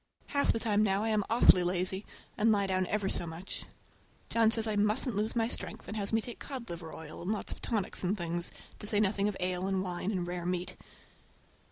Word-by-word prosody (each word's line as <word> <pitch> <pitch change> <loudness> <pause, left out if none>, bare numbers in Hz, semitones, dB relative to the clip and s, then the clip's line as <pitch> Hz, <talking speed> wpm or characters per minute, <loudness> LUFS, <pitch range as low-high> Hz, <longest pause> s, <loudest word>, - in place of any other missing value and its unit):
Half 280 0 +2
the 225 - -1
time 210 -2 +2
now 200 -1 +2
I 225 - 0
am 215 -1 +2
awfully 225 -5 +7
lazy, 185 +2 0 0.3
and 220 +1 +4
lie 200 -2 +3
down 185 -1 +1
ever 205 0 0
so 175 - +1
much. 165 +4 -5 0.7
John 230 -1 +5
says 225 0 +2
I 215 -1 0
musn't 210 +3 +2
lose 215 +3 -1
my 225 -1 +2
strength, - - -3
and 210 - -4
has 200 -2 -1
me 225 0 +3
take 240 +1 -7
cod 255 -8 -6
liver 165 -1 -6
oil 160 0 -8
and 180 +4 -2
lots 215 - -1
of - - -7
tonics 215 -6 -1
and 190 +4 +1
things, 175 -1 -1 0.3
to 210 - -6
say 205 0 +2
nothing 200 -1 +2
of 205 - -5
ale 180 0 0
and 190 -1 0
wine 180 +1 -3
and 185 -4 -1
rare 175 0 -4
meat. 180 0 -2
200 Hz, 225 wpm, -31 LUFS, 180-220 Hz, 0.7 s, awfully